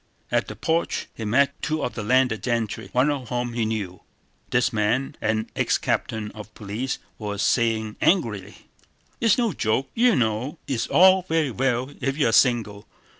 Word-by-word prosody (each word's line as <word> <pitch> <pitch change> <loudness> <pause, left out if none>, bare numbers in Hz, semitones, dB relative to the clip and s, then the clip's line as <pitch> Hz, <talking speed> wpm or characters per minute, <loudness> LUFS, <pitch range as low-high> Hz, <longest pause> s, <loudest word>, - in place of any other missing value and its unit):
At - - +1
the - - -7
porch 165 +1 -1
he 115 - -6
met 140 +7 +2
two 155 -2 -1
of - - -2
the 110 - -5
landed 125 0 +2
gentry, 115 -4 -2
one 130 +4 +3
of 130 -5 -5
whom 120 -1 -2
he 115 -1 0
knew. 100 -5 -4 0.5
This 125 0 +1
man, 110 +5 0
an 110 0 -1
ex - - +1
captain 110 -2 -2
of 110 0 -10
police, 110 +5 -4 0.2
was 105 -2 -3
saying 110 -3 +1
angrily: 105 - 0 0.5
"It's 225 -3 +3
no 235 -6 +1
joke, 120 +2 -1
you 240 -2 +4
know! 120 +5 -1
It's 135 -5 -1
all 190 +1 +6
very 160 -4 +1
well 130 +2 -1
if 135 +1 -1
you're 115 -7 +2
single. 110 -5 +2
120 Hz, 170 wpm, -24 LUFS, 110-135 Hz, 0.5 s, all